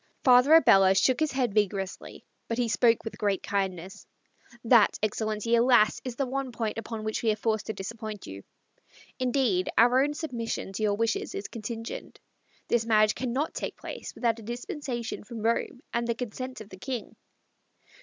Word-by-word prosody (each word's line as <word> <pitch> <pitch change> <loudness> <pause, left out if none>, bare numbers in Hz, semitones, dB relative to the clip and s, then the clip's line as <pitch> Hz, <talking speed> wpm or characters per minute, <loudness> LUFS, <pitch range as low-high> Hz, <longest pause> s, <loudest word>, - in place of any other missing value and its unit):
Father 255 +4 +7
Abella 195 -11 +6
shook 250 +6 +3
his 310 -2 +1
head 250 -5 0
vigorously, 200 -2 -2 0.2
but 230 - -2
he 245 -1 +1
spoke 230 0 +3
with 225 - -7
great 200 -2 0
kindness. 190 -2 -3 0.6
"That, 230 -3 +5
Excellency, 215 +1 -1
alas, 235 -2 +4
is 255 -3 -5
the 275 - -1
one 265 0 -3
point 225 -2 -3
upon 225 -1 -6
which 215 0 -2
we 230 - +1
are - - 0
forced 215 -1 -1
to 220 - -2
disappoint 215 +1 -7
you. 95 0 -8 0.8
Indeed, 245 -8 +1
our 245 +3 +5
own 295 +1 -1
submission 235 -10 -4
to 205 - -5
your 210 -1 +2
wishes 225 +1 -1
is 200 - -4
contingent. 230 +1 -7 0.5
This 235 -1 +2
marriage 215 -2 +4
cannot 260 +5 -2
take - - -5
place - - -8
without 230 -2 0
a - - -10
dispensation 240 +1 -5
from 220 +1 -8
Rome 235 +3 -1
and 235 0 0
the 235 - 0
consent 250 +1 -6
of 215 - -11
the 190 - -11
King." 245 +4 -5
230 Hz, 175 wpm, -28 LUFS, 210-245 Hz, 0.8 s, Father